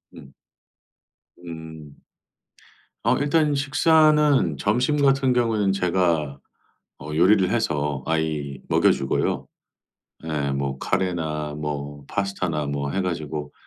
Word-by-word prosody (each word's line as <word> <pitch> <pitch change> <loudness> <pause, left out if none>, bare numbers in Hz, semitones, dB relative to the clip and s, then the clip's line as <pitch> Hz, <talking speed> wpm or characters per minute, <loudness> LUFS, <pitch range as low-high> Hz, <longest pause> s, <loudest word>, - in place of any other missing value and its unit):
음. 70 -5 -13 1.1
음. 80 -3 -10 1.1
어 - - +3
일단 150 0 +2
식사는 150 - +3
점심 125 - +1
같은 135 -2 +3
경우는 110 -5 +1
제가 85 -6 0 0.6
어 75 +2 -8
요리를 95 +3 +4
해서 75 - -1
아이 75 -4 -2
먹여 - - +4
주고요. 65 - -1 0.8
예, 70 -3 -2
뭐 70 -1 -3
카레나 80 -5 -2
뭐 70 -1 -5
파스타나 95 -6 -2
뭐 70 0 -3
해 95 - 0
가지고 75 -4 -4
80 Hz, 200 characters per minute, -23 LUFS, 75-110 Hz, 1.1 s, 요리를